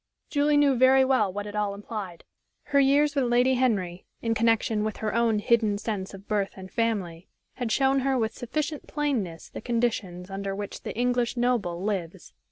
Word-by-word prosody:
Julie 290 0 +3
knew 290 -1 +5
very 260 +1 +5
well 255 -7 +2
what 205 +2 -5
it 205 0 -7
all 205 -1 -1
implied. 200 -4 -7 0.4
Her 280 - +2
years 285 +2 +4
with 275 -3 +1
Lady 245 +2 +3
Henry, 200 -9 0
in 230 -1 0
connection 225 -1 +2
with 215 -1 -3
her 215 -2 -2
own 230 -2 +2
hidden 215 -1 +2
sense 205 -3 -4
of 195 +1 -14
birth 205 -2 -1
and 190 0 -10
family, 200 -8 -2 0.3
had 245 -3 -2
shown 270 +2 +3
her 265 0 +1
with 220 -2 0
sufficient 300 +6 -4
plainness 245 - -2
the - - -8
conditions 210 -7 -2
under 195 0 -3
which 205 0 -6
the - - -6
English 245 0 0
noble 225 -8 0
lives. 190 -3 -4
225 Hz, 180 wpm, -26 LUFS, 200-255 Hz, 0.4 s, knew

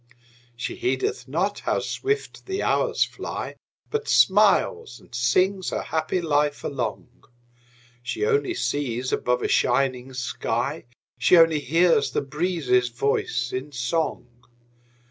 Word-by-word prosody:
She 120 - -5
heedeth 130 +2 -1
not 180 +9 -1
how - - 0
swift 420 0 -3
the 385 +1 -2
hours - - +2
fly, - - -6 0.4
But 445 0 -2
smiles 455 -2 +3
and - - -21
sings 185 +11 +1
her - - -3
happy 160 +3 -1
life 150 -2 0
along; 125 -2 -5 0.8
She 130 - -2
only 425 -5 +1
sees 130 - -2
above 125 0 0
a - - +1
shining 130 0 +1
sky; 125 +3 -2 0.3
She 180 - +5
only 165 -2 +5
hears 165 +5 +3
the - - +1
breezes' 140 -5 0
voice 120 -1 -1
in 130 +3 -4
song. 145 +4 -1
145 Hz, 125 wpm, -24 LUFS, 125-180 Hz, 0.8 s, She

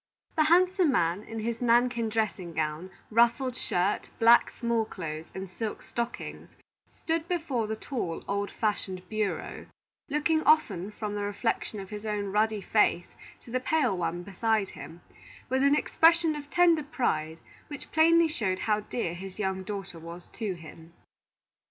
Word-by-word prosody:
The 310 - +4
handsome 360 0 +4
man, 175 -4 +1
in 225 0 -6
his 230 +1 -3
nankin 240 -1 +3
dressing 210 -6 -2
gown, 155 +3 -2 0.2
ruffled 235 +3 +3
shirt, 185 -3 0
black 230 +1 +6
small 235 -2 0
clothes, 165 -6 -6
and 190 0 -5
silk 210 +4 -5
stockings, 235 0 -5 0.4
stood 325 0 -3
before 305 -11 -1
the 220 - -2
tall, 215 - -4
old 200 0 -1
fashioned 190 -4 -2
bureau, 215 -2 -3 0.4
looking 305 +2 +1
often 205 - +3
from 210 0 -5
the 205 - -3
reflection 205 +1 -2
of 195 0 -9
his 210 0 -6
own 205 -2 -2
ruddy 215 0 +1
face 190 -4 +2 0.3
to 235 - -12
the 255 - +1
pale 255 -5 +1
one 175 0 -2
beside 205 +1 0
him, 170 +2 -10 0.5
with 260 +1 +1
an 280 +1 +5
expression 325 +1 +4
of 290 -1 -8
tender 340 -2 +4
pride, 165 - -1 0.3
which 290 -3 -9
plainly 330 +1 +5
showed 210 -11 -1
how 215 -1 +2
dear 210 -4 -3
his 190 +2 -8
young 190 -2 -1
daughter 190 -3 -6
was 170 +2 -10
to 210 -6 -3
him. 165 0 -13
215 Hz, 155 wpm, -28 LUFS, 190-260 Hz, 0.5 s, black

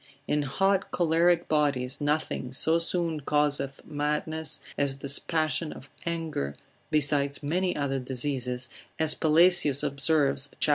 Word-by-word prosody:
In 150 - 0
hot 195 +7 0
choleric 170 +1 +1
bodies, 140 -3 0
nothing 145 -3 -2
so 160 +5 +4
soon 170 -2 -1
causeth 145 -1 -1
madness, 150 +1 -2 0.2
as 140 -1 -1
this 140 0 +2
passion 155 -1 -1
of 135 - -12 0.2
anger, 160 - -3 0.3
besides 145 -1 +2
many 180 +5 -1
other 140 -2 -2
diseases, 125 -1 -3 0.3
as 160 -1 +5
Pelesius 160 -3 +4
observes, 140 -1 +2
cap. - - +2
150 Hz, 125 wpm, -27 LUFS, 140-160 Hz, 0.3 s, as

